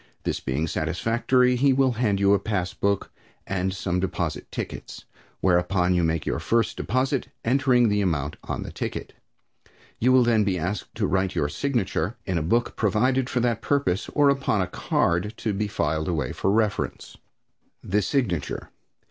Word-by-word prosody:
This - - -1
being 70 +5 -1
satisfactory, 115 +11 +1
he 135 +2 +4
will 135 -1 +3
hand 115 -4 0
you 100 0 +4
a 100 - +3
passbook, 100 0 -1 0.3
and 95 -1 -1
some 90 -1 -2
deposit 85 -4 -3
tickets, - - -6 0.4
whereupon 90 0 +2
you 90 -1 +2
make 80 -1 0
your - - -1
first 115 -1 +1
deposit, 130 +2 0 0.2
entering 125 -1 +4
the 105 -1 +1
amount 75 -6 -1
on - - -4
the - - -7
ticket. - - -5 0.9
You 125 +3 +3
will 130 -1 +6
then 115 -2 +3
be 95 -3 0
asked 90 +4 -4
to - - 0
write 95 -1 0
your 75 - +1
signature 110 - -1
in 90 -3 0
a - - -2
book 115 +10 0
provided 125 +5 +1
for 125 - 0
that 115 -2 0
purpose, 115 -5 0
or 145 -2 +5
upon 135 -6 0
a 90 - +2
card 90 +4 0
to 110 - -2
be 105 +2 -1
filed 80 -5 -1
away 75 -8 -1
for - - -1
reference. 105 0 -1 0.7
The 105 +3 +1
Signature. 100 - -1
100 Hz, 165 wpm, -25 LUFS, 90-120 Hz, 0.9 s, will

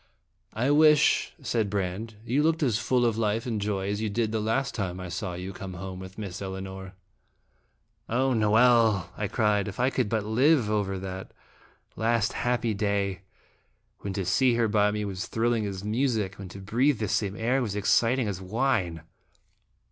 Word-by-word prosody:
" - - -39
I 140 - +3
wish," 150 0 +5
said 115 -4 0
Brande, 100 +3 -3
" - - -20
you 130 +5 +1
looked 160 +1 +2
as 120 -5 +2
full 125 0 +2
of 115 -1 +1
life 110 +1 0
and 110 -4 -2
joy 100 -2 -1
as 100 +1 -2
you 110 - -1
did 110 +1 -1
the 110 - 0
last 115 +5 0
time 95 -4 -3
I 90 -1 -6
saw 90 0 -4
you 90 +2 -6
come 95 -1 -7
home 95 +1 -7
with 95 0 -10
Miss 100 -3 -6
Elinor." 95 0 -6 1.1
"O 130 +3 +2
Noel!" 110 -4 +4
1 105 -2 -3
cried, 105 -2 +1
"if 100 - -7
I 125 +2 +2
could 125 -6 0
but 110 -2 -1
live 125 +1 +3
over 100 -2 0
that 95 0 -6 0.6
last 115 -1 +1
happy 120 -2 0
day, 100 -2 -1 0.8
when 100 - -5
to 95 -1 -2
see 120 +7 +3
her 115 -1 +2
by 105 -1 +3
me 105 0 -2
was 95 -2 -4
thrilling 115 -2 0
as 95 -1 -5
music, 110 -3 -1
when 95 -2 -7
to 100 - -10
breathe 120 +8 +1
the 110 0 -2
same 100 0 -1
air 125 +5 +1
was 105 -5 -2
exciting 115 +4 +2
as 95 -2 -4
wine 95 - -1
105 Hz, 185 wpm, -27 LUFS, 95-120 Hz, 1.1 s, wish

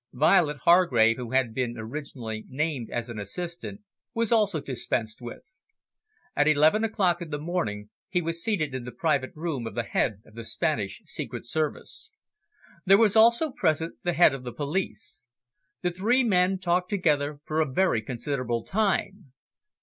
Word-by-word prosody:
Violet 150 +2 +3
Hargrave, 125 -11 +5
who 125 -2 -6
had 130 -4 +2
been 120 -1 -2
originally 115 -2 -6
named 140 -3 -2
as 120 0 -3
an 115 -3 -6
assistant, 170 - -6 0.3
was 230 -1 +1
also 210 -7 +3
dispensed 120 -4 -3
with. 365 - -11 0.7
At 145 - +3
eleven 155 +8 +4
o'clock 190 -6 +1
in 170 - -6
the 150 - -3
morning, 115 - -3 0.2
he 180 - +1
was 165 0 -2
seated 155 -11 -1
in 130 -2 -4
the 125 - -7
private 140 +1 0
room 150 -7 -3
of - - -8
the 120 - 0
Head 105 -2 -1
of - - -19
the 115 +1 -8
Spanish - - -2
Secret - - -5
Service. 155 - -3 0.7
There 195 0 +6
was 215 -2 +4
also 235 +7 +5
present 160 - 0
the 175 - 0
Head 165 -3 +5
of 135 -2 -6
the 125 - -5
Police. 145 - -3 0.6
The 180 - +1
three 225 +9 +2
men 190 -3 +3
talked 180 0 0
together 150 -7 +1
for 155 +1 0
a 150 -4 -1
very 155 -6 +2
considerable 120 0 -2
time. 195 - -1
155 Hz, 165 wpm, -26 LUFS, 125-180 Hz, 0.7 s, There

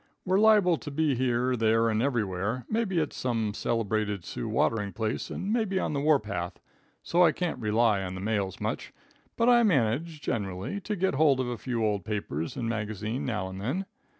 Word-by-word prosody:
We're 190 +1 +3
liable 210 -6 +5
to 160 - -7
be 150 0 +1
here, 125 0 +1
there 115 0 +3
and 110 -1 +1
everywhere, 115 -2 -1
mebbe 220 -3 -1
at 160 -4 0
some 115 -4 -1
celebrated 105 -4 -1
Sioux 115 - -4
watering 105 -2 0
place 110 0 -2
and 200 +3 -3
mebbe 220 -5 0
on 170 - -1
the 140 - 0
warpath, 105 - 0 0.4
so 175 +1 +3
I 165 - +6
can't 175 +2 -3
rely 110 -2 +2
on 90 -1 -4
the - - -5
mails 100 -2 -1
much, - - -3 0.4
but 230 - +2
I 240 -1 +6
manage, 155 - +1
generally, 100 - -3
to 210 +2 -3
get 190 -2 +1
hold 140 -2 +4
of 130 -1 -1
a 120 - -2
few 120 -4 -1
old 105 -3 0
papers 85 -7 -3
and 120 -3 -2
magazines 110 +2 -3
now 105 -6 -2
and 95 +1 -7
then. 150 - -2
120 Hz, 190 wpm, -28 LUFS, 105-160 Hz, 0.4 s, I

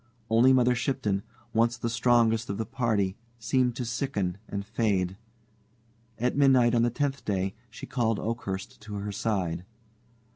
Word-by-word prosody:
Only 120 +4 +6
Mother 125 -1 +4
Shipton 120 -5 -1 0.3
once 115 +1 +2
the 120 - -3
strongest 115 -1 +2
of 100 - -2
the 110 - -2
party 110 -5 0 0.2
seemed 125 +1 +1
to 125 - -3
sicken 105 -7 -2
and 100 0 -4
fade. 100 -4 0 1.0
At 125 +2 0
midnight 130 -4 +5
on 120 - +4
the 120 - +3
tenth 140 +3 -2
day 95 -1 -1 0.2
she - - -9
called 115 -3 0
Oakhurst 105 -5 -4
to 105 -1 -7
her 100 0 -4
side. 95 -5 -1
115 Hz, 150 wpm, -28 LUFS, 100-120 Hz, 1.0 s, Only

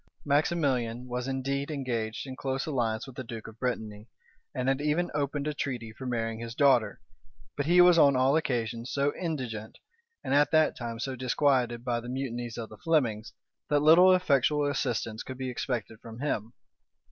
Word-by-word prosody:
Maximilian 140 -5 0
was 125 +1 -3
indeed 135 +2 -2
engaged 120 -7 -3
in 130 -1 -7
close 135 0 -2
alliance 115 -7 -1
with 135 -3 -12
the 130 - -5
duke 115 -2 -8
of 110 0 -12
Brittany 110 -4 -3 0.4
and 125 0 -3
had 135 +1 +1
even 150 +4 0
opened 145 0 -1
a 150 - -1
treaty 120 -6 -4
for 130 +3 -8
marrying 115 -2 -2
his 115 0 -6
daughter; 125 -8 +3 0.6
but 145 0 -2
he 175 +1 +6
was 175 -1 +7
on 140 -3 +6
all 130 +3 +3
occasions 120 -5 -1
so 140 +1 +1
indigent, 125 -11 -4 0.5
and - - -1
at 145 +1 +4
that 155 -1 +3
time 115 -1 -5
so 130 +2 -3
disquieted 125 -2 +1
by 120 -1 0
the 120 +1 -8
mutinies 120 -3 -4
of 115 -2 -5
the - - -13
Flemings, 125 -11 0 0.4
that 145 -1 +3
little 170 +5 +7
effectual 150 -4 +2
assistance 120 -6 -2
could 130 - -8
be 130 -1 -3
expected 120 -3 -4
from 115 -1 -10
him. 115 -5 -2
130 Hz, 180 wpm, -28 LUFS, 115-145 Hz, 0.6 s, was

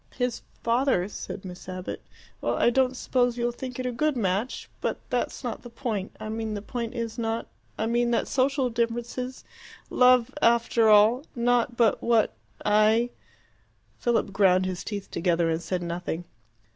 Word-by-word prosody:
"His 245 -1 -1 0.2
father," 235 -5 +2
said 200 -1 -7
Miss 180 0 -9
Abbott. 185 0 -5 0.4
"Well, - - 0
I 240 - +4
don't 260 0 +2
suppose 245 -2 +1
you'll 240 0 0
think 250 +1 -7
it 255 - -3
a 250 - 0
good 295 +3 0
match. 205 +3 -1
But - - -1
that's - - -1
not - - -4
the 240 - -10
point. 225 -5 -4
I 215 - -6
mean 220 0 -3
the 205 - -4
point 235 0 -4
is 230 -1 -4
not 225 0 -1 0.3
I 220 - 0
mean 240 +1 +1
that 235 - +1
social 265 -1 +1
differences 240 +2 -2 0.5
love, 250 -2 +5
after 235 -1 +4
all 215 +5 +6
not 240 0 +1
but 230 -3 +3
what 230 -2 +3 0.3
I 215 +3 +4 0.4
" - - -39
Philip 235 -4 +1
ground 185 -2 +4
his 185 0 -3
teeth 205 -2 -5
together 170 -1 +1
and 160 +1 -1
said 180 +1 -2
nothing. 175 0 -4
230 Hz, 170 wpm, -26 LUFS, 205-245 Hz, 0.5 s, all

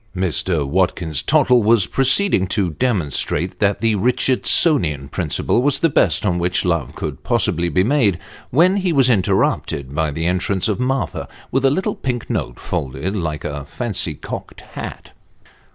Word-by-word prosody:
Mr. 90 -3 0
Watkins 85 -2 0
Tottle 130 -5 +3
was 110 -2 +3
proceeding 135 - +2
to 95 -2 -1
demonstrate 85 - -1
that 100 -1 +1
the 115 -1 +2
Richard 125 +5 +1
sonian 80 - +3
principle - - 0
was 145 +1 +2
the 165 - +2
best 135 - +2
on 90 -3 +1
which 90 +2 0
love 85 -7 -1
could - - -5
possibly 85 +2 0
be 90 +2 +2
made, 110 - +2 0.3
when 180 +9 +3
he 185 -3 0
was 135 -5 +4
interrupted 70 - 0
by 80 +1 0
the 80 +3 -3
entrance 90 +2 0
of 105 0 -1
Martha, 125 - -2 0.2
with 135 +1 0
a 135 - +5
little 190 +9 -1
pink 125 -3 -4
note 60 -1 -3
folded 70 +9 -3
like 75 -6 -3
a 75 -1 -4
fancy 95 - -2
cocked - - -8
hat. - - -8
95 Hz, 160 wpm, -19 LUFS, 85-130 Hz, 0.3 s, a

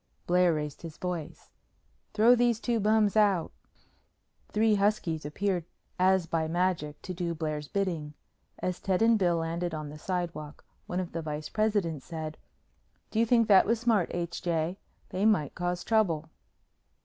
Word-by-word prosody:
Blair 180 0 +4
raised 150 -1 -4
his 165 -3 -9
voice. 175 -4 -5 0.6
"Throw 225 +3 +6
these 240 -2 +2
two 235 -1 0
bums 215 0 +3
out!" 200 -5 +3 1.0
Three 220 +1 +3
huskies 195 -7 0
appeared 185 +3 -1 0.4
as 190 -1 +4
by 165 -1 -1
magic 165 -3 -1
to 185 - -5
do 170 -1 -3
Blair's 155 -2 -3
bidding. 165 -7 -2 0.4
As 180 -1 -3
Ted 190 +2 +1
and 225 -1 +4
Bill 175 -3 +3
landed 165 +1 -2
on 155 -1 -5
the 150 +1 -10
sidewalk, 170 -4 -4 0.2
one 180 - -2
of 180 -2 -4
the 165 - -3
vice 150 -1 -5
presidents 205 -9 0
said, 155 -2 -6 0.7
"Do 220 - 0
you 230 - +3
think 230 -1 +4
that 195 -2 +6
was 230 +1 +2
smart, 225 -6 +2
H. 170 -1 -3
J.? 170 +2 -1 0.3
They 185 - -2
might 205 -10 +3
cause 175 0 -2
trouble." 165 -8 +1
180 Hz, 160 wpm, -29 LUFS, 160-205 Hz, 1.0 s, Throw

